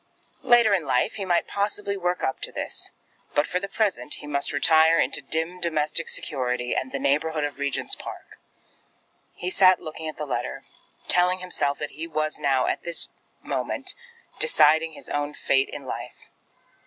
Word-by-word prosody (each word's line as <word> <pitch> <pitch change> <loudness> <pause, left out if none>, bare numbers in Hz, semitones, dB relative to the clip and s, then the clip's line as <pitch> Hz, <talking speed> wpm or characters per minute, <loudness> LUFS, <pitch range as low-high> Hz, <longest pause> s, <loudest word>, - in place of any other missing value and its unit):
Later 240 -5 +5
in 185 -4 +2
life, 125 -1 +2
he 200 -3 -4
might 175 -2 +2
possibly 200 0 -1
work 180 -2 -1
up 130 - -1
to - - -4
this; - - -3 0.5
but 145 0 +4
for 180 - -1
the 200 - -4
present 195 - -1
he - - -10
must 140 -1 -1
retire 160 +3 +5
into - - +2
dim 165 +3 -2
domestic 155 -1 0
security 125 -4 -1
and 130 - -2
the - - -2
neighbourhood 150 +3 +1
of 145 -1 -4
Regent's 140 -1 -1
Park. - - -9 1.0
He 180 - -4
sat 185 -2 +6
looking 160 0 -7
at 155 - -6
the 150 - -3
letter, 135 - -3 0.4
telling 180 +1 +5
himself 160 -6 0
that 150 - -5
he 160 +3 -6
was 155 -1 -1
now, 135 -3 +2
at - - -1
this 170 -1 -2 0.3
moment, - - -2 0.5
deciding 160 - +4
his - - -9
own 145 0 -2
fate 135 0 +2
in 140 - -8
life. - - -6
160 Hz, 170 wpm, -25 LUFS, 145-180 Hz, 1.0 s, sat